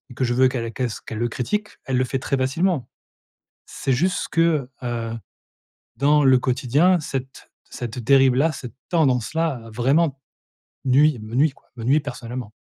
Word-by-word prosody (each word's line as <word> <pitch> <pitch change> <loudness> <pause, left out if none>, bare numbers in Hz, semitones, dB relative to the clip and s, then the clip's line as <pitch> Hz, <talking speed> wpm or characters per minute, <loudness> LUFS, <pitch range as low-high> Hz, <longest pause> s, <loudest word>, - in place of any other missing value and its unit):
que - - -1
je 120 -1 +1
veux 130 +1 +5
qu'elle 115 -3 -3
qu'elle 130 - -1
s 110 - -7
qu'elle 110 - -7
le 120 - +1
critique, 210 - -2 0.2
elle 130 -1 0
le 130 - +3
fait 135 +1 -2
très 135 +1 -1
facilement. 140 +3 0 0.8
C'est 135 - -2
juste 180 +8 0
que, 165 -6 +2
heu, 115 -2 -3 0.8
dans 145 +2 +4
le 130 -2 +6
quotidien 135 +8 +2
cette 135 -3 -6 0.2
cette 120 -1 -6
dérive-là, 135 +4 +4
cette 130 -5 -8 0.2
tendance-là, 150 -1 +1
heu, 115 - -11
vraiment 135 +5 +1 0.7
nuit, 140 +2 +4
me 110 +2 -7
nuit, 145 +3 +4
quoi, - - -27
me 115 - -7
nuit 140 +5 +4
personnellement. 125 -5 -6
130 Hz, 165 wpm, -22 LUFS, 125-150 Hz, 0.8 s, le